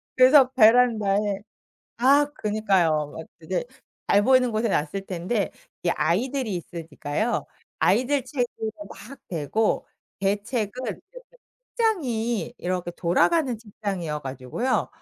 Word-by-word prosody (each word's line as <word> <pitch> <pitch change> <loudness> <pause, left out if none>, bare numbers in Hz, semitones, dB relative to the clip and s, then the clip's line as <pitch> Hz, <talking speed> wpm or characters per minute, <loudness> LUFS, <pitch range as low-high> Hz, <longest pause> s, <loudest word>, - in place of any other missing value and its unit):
그래서 260 +1 +7
베란다에 215 -4 +4 0.6
아 275 +4 +5
그니까요. 185 -9 +1
막 160 - -8
그게 175 +7 -3 0.4
잘 205 - +5
보이는 255 +1 +4
곳에 220 +1 0
놨을 190 +2 -1
텐데 185 +4 -2 0.3
이 175 - +1
아이들이 220 - 0
있으니까요. 170 +5 -3 0.4
아이들 255 +8 +2
책으로 245 -5 -3 0.2
막 210 +9 -12
대고 180 +7 0 0.4
제 195 +1 +3
책은 220 -3 -2
이렇게 215 - -5 0.7
책장이 245 - 0
이렇게 180 -1 -3
돌아가는 245 - +2
책장이어 195 -8 -4
가지고요. 135 - -2
210 Hz, 270 characters per minute, -25 LUFS, 175-250 Hz, 0.7 s, 그래서